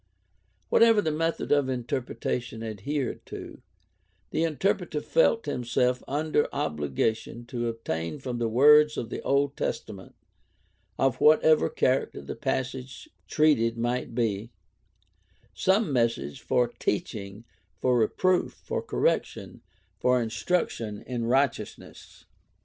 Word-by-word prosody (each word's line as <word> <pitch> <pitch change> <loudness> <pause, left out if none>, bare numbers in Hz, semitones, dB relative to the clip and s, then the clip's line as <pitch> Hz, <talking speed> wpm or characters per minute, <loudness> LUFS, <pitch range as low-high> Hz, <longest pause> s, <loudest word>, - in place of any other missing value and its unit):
Whatever 230 -2 +5
the 160 -6 0
method 165 +2 -1
of 145 -2 +3
interpretation 120 -1 -3
adhered 115 +6 -3
to, - - -9 0.7
the 160 - 0
interpreter 175 +1 0
felt 470 - +2
himself 125 +1 0
under 150 +1 +1
obligation 110 - -2
to 120 -1 -3
obtain 115 - -3
from 125 -3 -5
the 115 - 0
words 150 +6 +6
of 115 -1 -4
the - - -4
Old 140 0 +1
Testament, 95 -4 -5 0.8
of 135 -2 +1
whatever 155 0 +5
character 130 +1 0
the - - -6
passage 130 - -4 0.2
treated 120 -7 +2
might 120 0 -2
be, 110 -2 -1 1.0
some 190 - +2
message 115 - 0
"for 125 -1 +2
teaching, 105 -2 -4 0.3
for 125 -1 +2
reproof, 180 +11 +2
for - - -4
correction, - - -1 0.4
for 125 0 +3
instruction 115 -2 -2
in 120 -2 -3
right 135 +2 +3
eousness." - - -12
125 Hz, 115 wpm, -27 LUFS, 115-150 Hz, 1.0 s, words